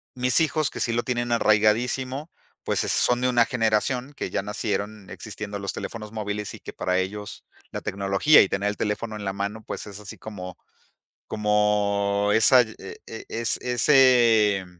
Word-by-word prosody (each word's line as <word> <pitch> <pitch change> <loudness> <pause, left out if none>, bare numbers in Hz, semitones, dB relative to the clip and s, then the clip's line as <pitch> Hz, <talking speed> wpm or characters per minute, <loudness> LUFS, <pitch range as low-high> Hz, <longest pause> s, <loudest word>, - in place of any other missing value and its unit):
mis 125 -1 +2
hijos 155 -2 +1
que - - -8
sí 115 - 0
lo 120 +1 0
tienen 120 -1 -2
arraigadísimo, 120 +6 +1 0.3
pues, - - 0
eh, - - -3
son 125 0 +2
de 125 - +2
una 120 -2 +4
generación 125 +4 0
que - - -4
ya - - -1
nacieron 105 0 -4
existiendo 105 -2 -7
los 100 -1 -4
teléfonos 105 -2 -7
móviles 105 -1 -4
y - - -10
que - - -9
para 90 0 -1
ellos 105 +2 -5 0.3
la - - -5
tecnología 100 +9 +4
y 95 - +1
tener 100 +1 -1
el 105 - -5
teléfono 110 +1 -3
en 105 -1 -7
la 95 - -2
mano 100 +3 -4
pues - - -6
es 100 0 -9
así 105 - -10
como, 90 -4 -8 0.7
como 105 -1 +1
esa 125 +3 +6
eh 110 -4 -9
eh 110 - -8
es, 115 0 -1
ese 120 -6 +4
110 Hz, 175 wpm, -24 LUFS, 100-120 Hz, 0.7 s, esa